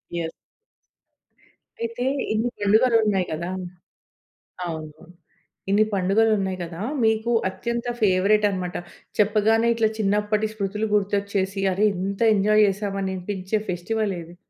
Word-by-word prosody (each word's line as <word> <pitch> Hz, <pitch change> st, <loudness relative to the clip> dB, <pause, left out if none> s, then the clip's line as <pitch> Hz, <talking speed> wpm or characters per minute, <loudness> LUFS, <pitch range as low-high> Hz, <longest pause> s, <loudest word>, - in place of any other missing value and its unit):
Yeah! 165 Hz, -1 st, -2 dB, 1.5 s
అయితే, 230 Hz, +2 st, -3 dB, 0.3 s
ఇన్ని 225 Hz, +3 st, 0 dB
పండుగలున్నాయి 215 Hz, -2 st, +3 dB
కదా! 170 Hz, +3 st, -3 dB, 1.2 s
అవును. 155 Hz, -2 st, -6 dB, 0.7 s
ఇన్ని 205 Hz, +2 st, +4 dB
పండుగలున్నాయి 195 Hz, 0 st, +2 dB
కదా! 170 Hz, +1 st, -7 dB, 0.2 s
మీకు 220 Hz, +1 st, +2 dB, 0.2 s
అత్యంత 235 Hz, +6 st, -4 dB, 0.2 s
ఫేవరేట్టనమాట. 195 Hz, -1 st, +2 dB, 0.4 s
చెప్పగానే 215 Hz, +2 st, +3 dB
ఇట్లా 225 Hz, -1 st, +2 dB
చిన్నప్పటి 210 Hz, +1 st, +1 dB
స్మృతులు 210 Hz, +1 st, -2 dB
గుర్తొచ్చేసి, 200 Hz, -1 st, 0 dB
అరె 200 Hz, +3 st, +2 dB
ఇంత 195 Hz, +3 st, -3 dB
ఎంజాయ్ 210 Hz, +2 st, +4 dB
చేశామా 195 Hz, 0 st, -2 dB
అనిపించే 190 Hz, +2 st, -2 dB
ఫెస్టివలేది? 180 Hz, -2 st, -3 dB
200 Hz, 95 wpm, -24 LUFS, 185-215 Hz, 1.5 s, ఇన్ని